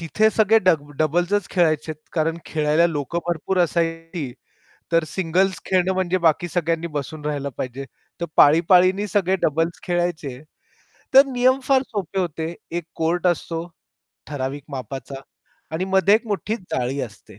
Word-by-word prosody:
तिथे 210 +7 +2
सगळे 220 +1 +4
डब 160 -7 +1
डबल्सच 175 +6 +1
खेळायचे, 155 -3 +1 0.2
कारण 165 0 0
खेळायला 155 +2 +2
लोकं 165 +1 -3
भरपूर 175 +2 -1
असायची. 165 -4 -1 0.6
तर 165 -1 +3
सिंगल्स 185 +2 0
खेळणं 185 0 +2
म्हणजे 185 0 0
बाकी 170 +1 +2
सगळ्यांनी 165 -1 -1
बसून 150 +2 -5
राहायला 145 -2 -2
पाहिजे. 130 +2 -5 0.4
तर - - 0
पाळी-पाळीनी 180 +6 +5
सगळे 190 -1 +1
डबल्स 165 +3 0
खेळायचे, 175 -7 -2 0.7
तर 270 +1 +9
नियम 255 0 +2
फार 265 0 +3
सोपे 195 -3 -4
होते. 165 -1 -3 0.2
एक 170 -1 -3
कोर्ट 170 +2 0
असतो, 170 -1 -1 0.6
ठराविक 140 -1 -4
मापाचा 135 +1 -6 0.5
आणि 170 +4 -1
मध्ये 190 +1 +4
एक 230 +2 +1
मोठी 210 +1 -2 0.2
जाळी 130 +2 -1
असते. 105 -4 -9
170 Hz, 140 wpm, -22 LUFS, 150-185 Hz, 0.7 s, तर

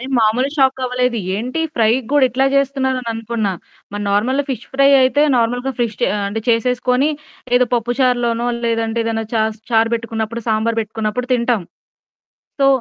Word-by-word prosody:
నెను 260 +2 -6
మామూలు 230 +5 +2
షాక్ 265 -1 +3
అవ్వలేదు. 250 -1 0 0.2
ఏంటి 250 +9 -3
ఫ్రై‌క్కూడా 255 +5 +2
ఇట్లా 265 +3 +1
చేస్తున్నారు 270 -2 +1
అని 240 - -7
అనుకున్నా. 225 -3 -2 0.4
మరి 205 0 -4
నార్మల్ 245 +7 +1
ఫిష్ 245 -3 -4
ఫ్రై 275 +1 +5
అయితే 275 +3 +3
నార్మల్‌గా 245 +3 0
ఫిష్ 230 -3 -1
చె - - +3
ఆహ్, 200 - -2
అంటే 225 +2 -3
చేసేసుకుని 250 +3 +2 0.5
ఏదో 250 - +4
పప్పుచారులోనో 240 0 0 0.2
లేదంటే 230 0 0
ఏదైనా 225 -1 -2
చాస్ 220 0 0
చారు 225 0 +3
పెట్టుకున్నప్పుడు 230 0 -4
సాంబార్ 225 +1 0
పెట్టుకున్నప్పుడు 220 +3 -3
తింటాం. 235 -4 +1 1.0
సో 275 - +5
235 Hz, 150 wpm, -18 LUFS, 225-255 Hz, 1.0 s, ఫ్రై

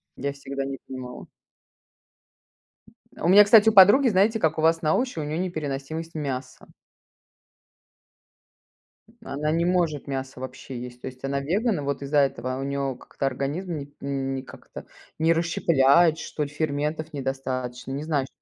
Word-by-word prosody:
Я 140 +1 -3
всегда 140 0 -5
не 135 0 -5
понимала. 130 -1 -8 1.9
У - - -1
меня, 200 +3 +9
кстати, 215 +1 +6
у - - -1
подруги, 205 +8 +8
знаете, 210 +3 +3
как 160 -4 +1
у - - 0
вас 165 +1 +3
на 155 - +3
овощи, 250 -6 -1
у - - -2
неё 150 +2 -3
непереносимость 160 -2 -4
мяса. 135 -4 -5 2.6
Она 150 +2 -2
не 165 +2 +1
может 170 -6 0
мясо 135 -1 -5
вообще 130 -1 -7
есть, 125 0 -9
то - - -9
есть 130 +1 -10
она 140 0 -1
веган, 200 - 0
и - - -4
вот 140 -1 -3
из-за 140 +1 -1
этого 130 -2 0
у - - -3
неё 140 -1 -2
как-то 135 +2 -4
организм 155 +6 -3
не 145 0 -8
не 135 -1 -3
как-то 130 - -12 0.3
не 165 +1 +3
расщепляет, 165 -1 +3
что 155 - -6
ли, 145 - -4
ферментов 150 +1 -3
недостаточно, 130 -2 -4
не 140 +2 -4
знаю 150 -4 0
что. - - -14
145 Hz, 160 wpm, -25 LUFS, 135-165 Hz, 2.6 s, меня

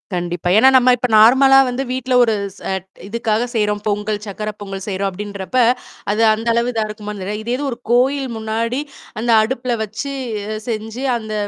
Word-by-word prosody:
கண்டிப்பா. 175 0 -2
ஏன்னா, 265 +4 +7
நம்ம 255 0 +5
இப்ப 250 - -1
நார்மலா 265 +5 +7
வந்து, 255 +2 -2
வீட்ல 260 0 -2
ஒரு 225 -2 +2 0.2
ச - - -17 0.5
இதுக்காக 230 +1 -1
செய்றோம் 210 -1 0
பொங்கல், 210 0 -1
சர்கக்கரை 210 +1 -5
பொங்கல் 195 -1 -6
செய்றோம் 195 0 -1
அப்படின்றப்ப, 200 +4 -5 0.5
அது, 215 +2 0
அந்த 225 +2 -5
அளவு 235 +1 +1
இதா 220 -1 0
இருக்குமான்னு 210 -2 -7
தெரில. 210 +2 -3
இதே 240 +2 -1
இது - - -3
ஒரு 235 - -5
கோயில் 265 +2 +2
முன்னாடி 225 +4 -2 0.4
அந்த 235 +1 0
அடுப்புல 245 +2 -1
வச்சு 225 +7 -5 0.6
செஞ்சு 225 +2 -4 0.2
அந்த 215 -1 -7
220 Hz, 165 wpm, -18 LUFS, 210-245 Hz, 0.6 s, ஏன்னா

